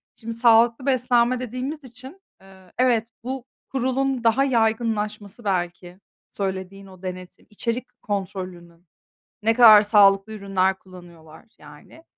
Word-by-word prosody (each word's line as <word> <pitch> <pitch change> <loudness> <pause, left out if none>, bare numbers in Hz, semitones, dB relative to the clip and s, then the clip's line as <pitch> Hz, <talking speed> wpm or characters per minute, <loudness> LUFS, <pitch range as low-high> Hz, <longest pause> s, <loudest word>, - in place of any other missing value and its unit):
şimdi 230 0 -7
sağlıklı 230 +2 +4
beslenme 250 -1 +2
dediğimiz 255 +5 -5
için, 260 +9 -13 0.2
eee, 190 -1 -19
evet, 240 -3 +2 0.2
bu 260 0 -5 0.2
kurulun 265 -1 -1
daha 230 +4 +3
yaygınlaşması, 220 -3 -1
belki 180 -1 -3 0.3
söylediğin 195 0 -5
o 185 -1 -16
denetim 185 -1 -9
içerik 235 +4 -5
kontrolünün. 185 -4 -6 0.6
Ne 225 +1 +3
kadar 220 -3 +8
sağlıklı 205 0 +4
ürünler 190 -2 -1
kullanıyorlar, 170 -2 -15
yani. 325 - -16
220 Hz, 115 wpm, -23 LUFS, 190-245 Hz, 0.6 s, kadar